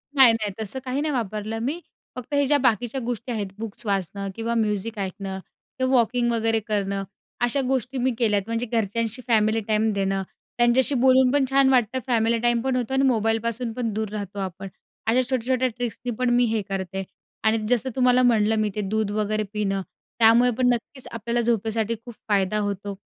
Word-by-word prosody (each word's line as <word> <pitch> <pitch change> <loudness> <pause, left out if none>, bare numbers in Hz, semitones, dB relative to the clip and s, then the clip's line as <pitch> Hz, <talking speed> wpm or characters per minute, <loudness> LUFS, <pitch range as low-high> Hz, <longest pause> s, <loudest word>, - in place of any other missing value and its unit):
नाही 260 -4 +8
नाही, 215 -2 -2
तसं 220 +5 -3
काही 260 +2 -1
नाही 305 0 -1
वापरलं 215 -2 -3
मी. 300 +6 -2 0.4
फक्त 250 +2 -8
हे 285 0 +3
ज्या 290 +1 +4
बाकीच्या 245 -1 +1
गोष्टी 240 0 -4
आहेत 210 -4 -2
बुक्स 225 +1 -7
वाचणं 200 0 -2
किंवा 230 +1 -2
म्युझिक 215 0 -1
ऐकणं 190 0 -4 0.4
किंवा 260 0 +1
वॉकिंग 240 0 +2
वगैरे 225 -1 +1
करणं, 200 -2 -2 0.4
अशा 240 +3 +3
गोष्टी 260 0 -1
मी 255 +1 +1
केल्यात. 210 -4 +2
म्हणजे 230 +1 -1
घरच्यांशी 225 +1 -1
फॅमिली 220 -1 +3
टाईम 220 0 +2
देणं, 195 -1 -1 0.3
त्यांच्याशी 245 +3 +3
बोलून 260 -1 +5
पण 285 -2 +3
छान 270 0 +4
वाटतं. 255 -1 +2
फॅमिली 230 -1 +2
टाईम 240 0 +2
पण 260 +1 -1
होतो 250 0 -2
आणि 265 0 +2
मोबाईलपासून 225 0 0
पण 230 -2 -2
दूर 215 0 -2
राहतो 205 -1 -5
आपण. 190 0 -5 0.4
अशा 240 +3 +4
छोट्या-छोट्या 255 0 +1
ट्रिक्सनी 245 0 -4
पण 255 -1 +1
मी 240 0 +4
हे 225 -1 0
करते 195 0 -3 0.4
आणि 220 +1 +3
जसं 250 +1 +1
तुम्हाला 250 -1 +4
म्हटलं 225 -3 +3
मी, 215 -1 +1
ते 210 - -1
दूध 210 +1 -1
वगैरे 215 0 0
पिणं, 195 -2 -1 0.4
त्यामुळे 235 +2 +6
पण 255 -1 +2
नक्कीच 245 +3 -6
आपल्याला 235 +1 -1
झोपेसाठी 225 -1 0
खूप 240 - -8 0.2
फायदा 200 0 +2
होतो. 200 -1 -3
225 Hz, 180 wpm, -24 LUFS, 210-250 Hz, 0.4 s, नाही